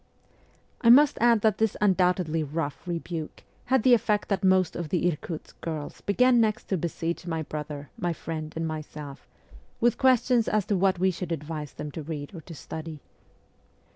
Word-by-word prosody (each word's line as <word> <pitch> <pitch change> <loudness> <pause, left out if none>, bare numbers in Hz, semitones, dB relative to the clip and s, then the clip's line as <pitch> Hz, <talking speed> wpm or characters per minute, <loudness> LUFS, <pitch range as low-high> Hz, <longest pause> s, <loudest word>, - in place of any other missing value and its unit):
I 230 - +4
must 280 +4 +7
add 235 -2 +5
that 215 -2 +2
this 220 -2 +1
undoubtedly 180 -5 +2
rough 150 +2 -4
rebuke 170 -2 -5 0.2
had 260 -3 +2
the 255 - +6
effect 210 -2 +2
that 200 -1 0
most 185 -2 +3
of 170 -3 -4
the 180 +1 +1
Irkutsk 160 -1 -5
girls 155 -3 -5
began 245 +4 +4
next 215 -1 +1
to 190 - +1
besiege 170 +1 -3
my 160 -2 -2
brother, 150 -1 -6
my 175 -4 0
friend, 155 -1 -5
and 165 0 -2
myself 150 -2 -7 0.5
with 240 +1 +2
questions 250 -2 +3
as 215 -2 +1
to 205 - 0
what 190 0 +2
we 190 +2 +2
should 180 0 -6
advise 150 -2 -5
them 150 - -6
to 160 - -6
read 150 0 -6
or 170 - -8
to 165 +1 -11
study. 160 +1 -7
175 Hz, 175 wpm, -27 LUFS, 155-210 Hz, 0.5 s, must